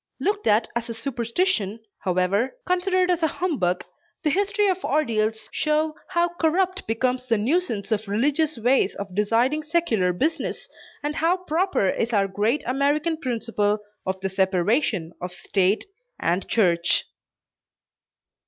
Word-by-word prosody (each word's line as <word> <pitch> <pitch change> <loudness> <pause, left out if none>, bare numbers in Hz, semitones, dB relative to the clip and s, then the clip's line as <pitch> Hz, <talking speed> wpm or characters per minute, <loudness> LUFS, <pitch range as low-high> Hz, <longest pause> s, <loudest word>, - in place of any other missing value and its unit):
Looked 410 +1 -1
at 220 +2 +4
as 235 0 -2
a 230 - -4
superstition 230 - -1 0.2
however 185 - 0
considered 365 0 +2
as 350 -1 0
a 320 - +4
humbug 275 - -1 0.4
the 305 - +2
history 405 +4 +2
of 375 -1 0
ordeals 220 -6 0
show 305 0 +1
how 345 -1 +1
corrupt 370 +3 +1
becomes 250 +3 0
the 230 -2 +2
nuisance 230 - 0
of 215 -1 0
religious 285 +9 +1
ways 240 -3 +2
of 200 -2 -6
deciding 230 +9 +2
secular 300 - +1
business, 295 - -2 0.4
and 295 +1 -2
how 335 +3 +2
proper 365 - 0
is 230 +5 -1
our 200 -2 +3
great 210 +9 0
American 290 +5 +1
principle 230 -6 -1 0.3
of 190 0 -2
the 195 - -1
separation 190 - +1
of 180 0 -5
state 195 +2 +1 0.3
and 175 +3 0
church. 175 -6 +2
240 Hz, 135 wpm, -24 LUFS, 205-320 Hz, 0.4 s, at